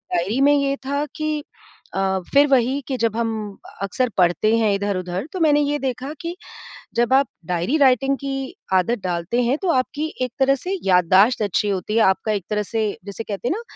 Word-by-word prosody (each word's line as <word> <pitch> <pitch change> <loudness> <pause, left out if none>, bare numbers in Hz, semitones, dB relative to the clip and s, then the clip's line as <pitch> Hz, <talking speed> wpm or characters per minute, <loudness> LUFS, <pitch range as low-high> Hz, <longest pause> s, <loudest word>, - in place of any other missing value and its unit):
diary 195 +9 0
में 285 +1 +5
ये 280 -1 +1
था 280 +2 -1
कि 310 -1 -2 0.5
अ, - - 0 0.3
फ़िर 285 +1 +7
वही 270 +1 +2
कि 270 - -2
जब 225 -2 0
हम 230 -1 0 0.5
अक्सर 235 +6 0
पढ़ते 180 +4 +3
हैं 220 -3 +2
इधर-उधर 190 -1 -2
तो 375 - -4
मैंने 295 -3 +4
ये 290 0 0
देखा 265 +1 -3
कि 340 +1 -4 0.6
जब 240 +2 +1
आप 275 +1 +4 0.2
डायरी 180 - 0
राइटिंग 270 0 +3
की 270 -1 -4 0.2
आदत 190 +6 +2
डालते 180 +7 -1
हैं 250 +4 +2
तो 375 - 0
आपकी 290 +4 -1 0.2
एक 250 -1 -2
तरह 270 +1 +4
से 375 +7 -4
याददाश्त 190 +5 +4
अच्छी 205 +1 0
होती 200 +1 -2
है, - - +4
आपका 190 +3 +2
एक 200 -4 -2
तरह 210 0 0
से 220 +2 -2 0.2
जिसे 200 +3 -6
कहते 210 +3 -4
हैं - - +1
ना, 455 - -6
240 Hz, 195 wpm, -21 LUFS, 200-275 Hz, 0.6 s, फ़िर